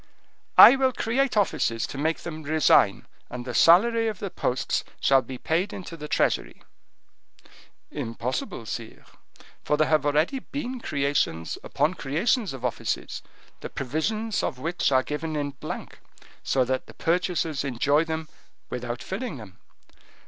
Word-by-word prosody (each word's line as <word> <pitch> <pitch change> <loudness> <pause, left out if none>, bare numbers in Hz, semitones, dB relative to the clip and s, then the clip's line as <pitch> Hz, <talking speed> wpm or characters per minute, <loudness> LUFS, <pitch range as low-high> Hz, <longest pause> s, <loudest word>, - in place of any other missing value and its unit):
"I 255 - +11
will 265 -1 +3
create 245 +2 0
offices 150 - +1
to - - -8
make 160 +2 0
them 160 -2 -6
resign, 150 -9 +3 0.2
and 120 0 -6
the 125 - -5
salary 225 - +5
of 215 -3 -2
the 195 -1 -5
posts 125 - -1 0.2
shall 135 -1 +4
be 130 +1 -8
paid 170 +9 -1
into 180 -3 -7
the 150 -2 -7
treasury." - - 0 1.3
"Impossible, 115 0 -4
sire, 115 0 -7 0.6
for 150 - +1
there 155 0 +3
have 155 -2 +3
already 150 - +1
been 260 -1 -5
creations 140 - -1
upon 160 - 0
creations 185 - 0
of 130 -2 -6
offices, 125 - -3 0.4
the - - -7
provisions 200 - -2
of - - -2
which 165 +3 -1
are 130 -1 +4
given 155 +2 -4
in 145 -1 -2
blank, 135 - -8 0.4
so 130 -1 +1
that 130 +1 -2
the - - -14
purchasers 165 -4 0
enjoy 140 +3 +2
them 160 -1 -4 0.4
without 120 0 -4
filling 190 - -4
them. 105 -6 -12
155 Hz, 145 wpm, -26 LUFS, 130-185 Hz, 1.3 s, I